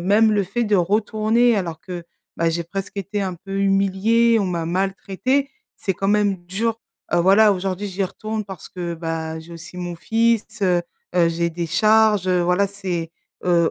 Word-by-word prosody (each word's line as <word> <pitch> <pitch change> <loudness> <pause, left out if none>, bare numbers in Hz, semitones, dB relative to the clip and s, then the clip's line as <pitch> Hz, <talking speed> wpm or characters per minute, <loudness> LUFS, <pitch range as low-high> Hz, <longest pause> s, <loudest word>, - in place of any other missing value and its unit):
même 215 +3 +4
le 205 -1 +2
fait 215 +6 -1
de 210 -1 +1
retourner 215 +5 +2
alors 170 -5 -3
que, 175 -2 -7 0.3
bah, 165 0 +2
j'ai 170 +1 -2
presque 195 +4 -6
été 200 +1 -2
un 185 -2 -2
peu 195 +3 -6
humilié 200 +4 +3
on - - 0
m'a 170 -2 -2
maltraité 195 +9 -1 0.3
c'est 195 - -1
quand 195 +2 -2
même 205 -1 +2
dur.» 225 +5 -2 0.3
Heu, 175 - +4
voilà 200 +4 +6
aujourd'hui 190 +1 -3
j'y 195 +1 -2
retourne 215 +3 -4
parce 190 -4 -9
que, 175 -2 -4
bah, 160 -1 -4
j'ai 165 +2 -12
aussi 170 +2 -10
mon 175 -1 -4
fils, 225 +4 +2 0.2
heu 180 -2 +3 0.3
heu, 170 -2 +5
j'ai 170 +1 -1
des 170 +1 -3
charges, 215 +1 +4
heu, 180 -1 +3
voilà 180 +3 +2
c'est, 180 -4 -4 0.3
heu, 170 -2 +3
195 Hz, 185 wpm, -21 LUFS, 175-215 Hz, 0.3 s, voilà